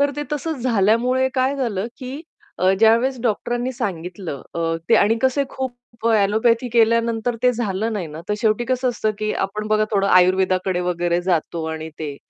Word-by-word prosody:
तर 285 0 +3
ते 295 - -2
तसंच 295 -2 -3
झाल्यामुळे 245 +3 +2
काय 260 +1 +1
झालं 225 -7 -2
की 255 -1 -7 0.5
अ, 185 +1 +3
ज्यावेळेस 230 +4 +4
डॉक्टरांनी 240 +2 -1
सांगितलं 180 - -5
अ, 170 - -3 0.3
ते 230 - +5
आणि 210 +2 +4
कसे 265 +2 +2
खूप 245 -3 -6
ॲलोपॅथी 225 +3 +2
केल्यानंतर 230 0 +2
ते 250 0 +4
झालं 225 -2 -2
नाही 200 -5 -3
ना, 155 +1 -9
तर 210 - +1
शेवटी 220 0 +1
कसं 255 +1 0
असतं 235 -3 -1
की 215 0 -1
आपण 210 +2 -4
बघा 215 0 +3
थोडं 200 -2 +1
आयुर्वेदाकडे 185 0 +3
वगैरे 175 -1 0
जातो 170 -2 -1
आणि 160 0 -5
ते. 150 -3 -5
220 Hz, 170 wpm, -21 LUFS, 190-245 Hz, 0.5 s, ते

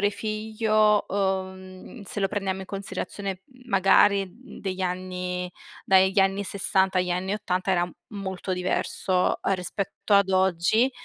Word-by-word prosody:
genitore-figlio 215 0 +1
uhm, 190 +2 -3
se 205 +1 -5
lo 195 - +2
prendiamo 190 -1 -2
in 190 - -8
considerazione 195 0 -5 0.2
magari 195 -1 +4
degli 195 -5 -7
anni 180 0 -3 0.3
dagli 190 +1 +4
anni 195 +1 +1
60 190 -1 +2
agli 180 0 0
anni 180 +2 -1
80 185 -2 -2
era 175 -1 +1 0.2
molto 190 -2 -4
diverso 180 0 0 0.2
rispetto 190 +3 -2
ad 200 -1 +5
oggi, 190 +6 +3
190 Hz, 120 wpm, -25 LUFS, 185-200 Hz, 0.3 s, ad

